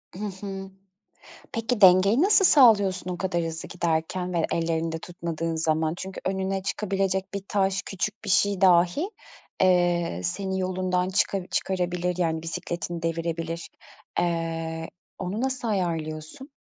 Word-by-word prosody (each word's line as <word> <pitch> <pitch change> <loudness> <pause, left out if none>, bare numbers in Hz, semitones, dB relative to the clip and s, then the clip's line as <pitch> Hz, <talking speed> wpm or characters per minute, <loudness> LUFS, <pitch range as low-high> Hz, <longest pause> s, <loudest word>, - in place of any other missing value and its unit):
Hı 205 +3 -4
hı. 195 -1 -6 0.8
Peki, 230 -1 -2
dengeyi 190 +6 +6
nasıl 395 +1 +6
sağlıyorsun 205 - +5
o 180 - -3
kadar 175 -2 -1
hızlı 165 0 -5
giderken 175 +1 -1
ve 170 -2 +1
ellerinde 165 -1 -1
tutmadığın 165 -1 -4
zaman? 160 0 +1
Çünkü 190 +1 -6
önüne 190 0 -1
çıkabilecek 195 -1 -1
bir 200 -1 -4
taş 195 -1 +1
küçük 205 +3 -3
bir 200 - -4
şey 200 0 +3
dahi, 180 - +4 0.5
eee, 175 - +2
seni 190 - -2
yolundan 185 0 0
çıka 190 -1 0
çıkarabilir, 180 -1 -1
yani, 160 -2 0
bisikletini 175 0 -4
devirebilir. 165 0 -3 0.5
Eee, 165 -1 -2 0.3
onu 195 +5 -3
nasıl 260 -3 -2
ayarlıyorsun? 165 - -3
180 Hz, 125 wpm, -26 LUFS, 165-195 Hz, 0.8 s, dengeyi